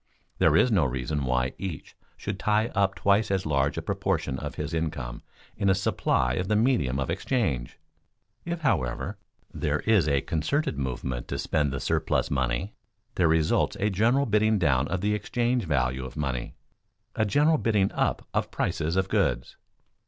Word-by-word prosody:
There - - +4
is 125 - +4
no 95 -6 +4
reason 65 +2 -2
why 65 0 0
each 95 -6 -6 0.2
should 100 -2 -5
tie 110 +2 +2
up 100 -3 +1
twice 100 +2 +2
as 95 -1 0
large 70 0 +1
a 80 - -3
proportion 95 -8 -1
of - - -6
his - - -4
income 75 -7 -3 0.3
in 100 - +1
a 95 - +4
supply 60 -9 +1
of 90 +6 -2
the 105 - +2
medium 105 - +2
of 65 - -1
exchange. 70 - -1 0.7
If, 170 0 -4
however, 100 - -1 0.3
there 75 0 -1
is 105 -8 +3
a 70 -2 +2
concerted 80 - -1
movement 65 -2 -3
to - - -3
spend 75 -3 0
the 70 - -3
surplus - - 0
money, 65 - -1 0.4
there 90 - +2
results 80 -1 +2
a 105 +1 +1
general 120 +8 +2
bidding 110 -1 +3
down 70 -6 +2
of 95 - -2
the 105 +1 +1
exchange 120 +2 0
value 65 -3 0
of 65 +3 -8
money, 65 -5 -3 0.6
a 110 - +2
general 150 +8 +3
bidding 105 -4 +2
up - - -1
of - - 0
prices 80 +3 -1
of 95 0 +1
goods. - - 0
85 Hz, 170 wpm, -27 LUFS, 70-105 Hz, 0.7 s, There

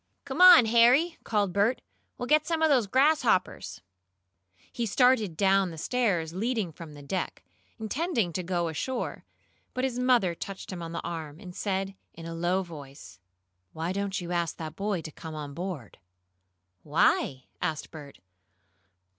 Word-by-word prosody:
"Come - - -2
on, 360 -9 +10
Harry!" 245 +9 +4
called 205 -4 0
Bert. 210 +5 +2 0.4
"We'll 245 - -4
get 305 +3 +3
some 325 -1 0
of 320 - +5
those 250 -7 +3
grasshoppers." 260 -5 +1 0.9
He 235 -1 -2
started 220 - +3
down 195 0 +3
the 165 - -9
stairs 180 -6 0
leading 215 -2 -1
from 160 -1 -11
the 145 - -11
deck, 185 +6 -4 0.3
intending 225 - -1
to 185 - -2
go 175 -1 -1
ashore, 240 +11 -4 0.5
but 255 - -1
his 255 -2 -1
mother 245 -8 +3
touched 195 +4 -7
him 175 - -6
on 165 -1 -6
the 170 - -5
arm, 160 -3 -6
and 180 -3 -10
said, 195 -1 -2 0.2
in 165 - -9
a 165 - -5
low 175 +3 0
voice: 140 - -11 0.5
"Why 165 +2 -3
don't 200 0 -2
you 175 -1 -6
ask 170 -2 -1
that 160 -1 -6
boy 200 -2 -2
to 155 - -8
come 160 +1 -9
on 145 -2 -6
board?" 170 - -6 0.8
"Why?" 130 +7 +1 0.2
asked 160 -4 -3
Bert. 145 -3 -11
190 Hz, 160 wpm, -28 LUFS, 165-240 Hz, 0.9 s, on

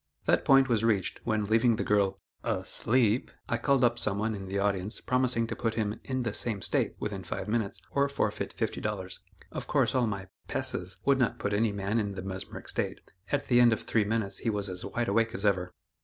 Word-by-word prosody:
That - - +3
point 135 0 +6
was 115 -3 +1
reached, 105 -5 +1
when 110 -2 +1
leaving 115 +3 +3
the - - -2
girl 100 -2 +2 0.2
"asleep," 120 -1 +1 0.2
I 120 - 0
called 135 +1 +3
up 120 0 +3
some 100 - +1
one 110 +2 0
in 95 -2 -6
the 95 +1 -2
audience, 100 +1 0
promising 125 -2 +1
to - - -4
put 115 -2 -1
him 110 -2 -1
"in 130 -2 -2
the 115 -3 -2
same 105 -5 -2
state" - - 0
within - - -4
five - - -4
minutes, 110 -2 -1
or 140 0 +2
forfeit 140 - -1
fifty - - -2
dollars. 95 -3 -3 0.3
Of - - -5
course, - - +2
all 125 -3 +2
my 100 -3 -3 0.2
"passes" 90 +1 -2
would 140 -1 +4
not 125 -4 +1
put 100 - -2
any 110 +1 +2
man 100 +2 -1
in 100 -2 -2
the 95 - -5
mesmeric 95 -1 -5
state; - - -1 0.3
at 145 - +1
the 120 -1 +4
end 120 -1 +6
of 110 - -3
three 110 - +2
minutes 105 -1 -1
he 115 - -1
was 105 -2 -1
as 90 0 -5
wide 115 +4 -2
awake 115 +3 +1
as 105 - -3
ever. 90 -3 +2
110 Hz, 220 wpm, -29 LUFS, 100-120 Hz, 0.3 s, point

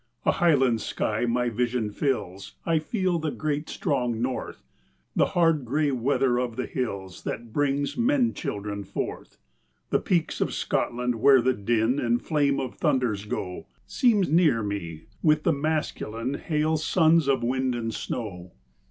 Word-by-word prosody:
A - - +5
Highland 135 - +3
sky 110 +4 -1
my 120 +1 +1
vision 120 -1 -1
fills; 100 -7 -3
I 165 -1 +2
feel 185 0 -1
the 155 -1 -1
great, 150 0 -3
strong 125 -5 -1
North 125 - -3 0.5
The - - +4
hard 165 -4 +3
grey 145 +4 +1
weather 130 0 +1
of 125 -2 -2
the 125 - -2
hills 100 -7 -4
That 115 -1 -6
brings 145 0 0
men 245 0 +2
children 100 -7 -4
forth. 95 - -5 0.5
The - - +3
peaks 170 -3 0
of - - 0
Scotland, 125 0 -1
where 135 0 +7
the 130 +2 +2
din 115 +5 +1
And 120 -2 +1
flame 145 -3 +1
of 130 - -4
thunders 125 -9 +1
go, 90 -3 -5 0.2
Seem 230 -5 +3
near 160 - +3
me, 85 -6 -4 0.2
with 155 -1 +3
the 170 - +3
masculine, 140 -5 -2
Hale 155 +1 0
sons 160 -1 +3
of 135 -3 +2
wind 130 +1 0
and 115 -1 -3
snow. 90 -7 -5
130 Hz, 150 wpm, -26 LUFS, 115-155 Hz, 0.5 s, where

